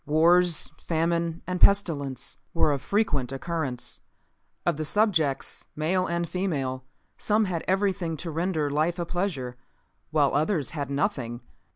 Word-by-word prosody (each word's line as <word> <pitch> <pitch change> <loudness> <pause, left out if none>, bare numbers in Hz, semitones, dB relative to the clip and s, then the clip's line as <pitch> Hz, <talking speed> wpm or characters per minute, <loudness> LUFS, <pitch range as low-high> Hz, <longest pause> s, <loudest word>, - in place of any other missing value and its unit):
Wars, 170 +2 +4
famine 170 0 0
and 180 0 -3
pestilence 145 - +2 0.2
were 155 - +4
of 140 -2 -1
frequent 145 - 0
occurrence. 135 -3 -3 0.7
Of 170 -4 +2
the 155 - -2
subjects, 165 -6 +1
male 185 +5 +1
and 170 0 -1
female, 140 -9 -2 0.4
some 215 +1 +2
had 175 -4 -2
everything 185 -4 +1
to 165 +2 -5
render 160 -2 0
life 155 +4 +1
a 175 - -2
pleasure, 160 -9 -2 0.5
while 150 -3 +3
others 150 - +1
had 145 -3 -4
nothing. 140 - -1
165 Hz, 135 wpm, -27 LUFS, 145-180 Hz, 0.7 s, Wars